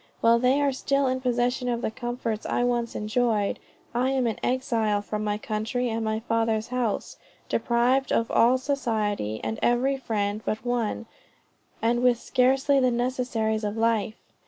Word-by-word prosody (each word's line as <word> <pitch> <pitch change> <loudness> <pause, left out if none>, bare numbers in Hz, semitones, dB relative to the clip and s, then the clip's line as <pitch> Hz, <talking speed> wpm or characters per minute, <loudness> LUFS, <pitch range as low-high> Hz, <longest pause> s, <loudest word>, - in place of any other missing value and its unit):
While 230 +1 +4
they 255 +3 +3
are 285 -1 +2
still 275 +1 0
in 260 0 0
possession 245 0 0
of 235 -1 -2
the - - -1
comforts 240 -2 -4
I - - 0
once 240 -1 0
enjoyed, 215 -1 0 0.3
I 250 +2 +1
am 265 -2 +1
an 225 -2 -1
exile 230 -5 0
from 210 +1 -4
my 210 0 -1
country 220 +4 -2
and 225 0 -2
my 220 0 -1
father's 225 -1 0
house, 245 -4 -2 0.3
deprived 250 +3 +1
of 230 - +1
all 245 +3 +5
society 220 - -1
and 110 0 -3
every 260 +3 +2
friend 210 -4 -2
but 215 +2 -3
one, 235 -2 -1 0.8
and 240 +1 +2
with 245 -1 +3
scarcely 270 +3 +2
the 255 -1 +3
necessaries 240 -3 -1
of 210 +1 -2
life. 225 -1 +1
235 Hz, 160 wpm, -26 LUFS, 220-250 Hz, 0.8 s, all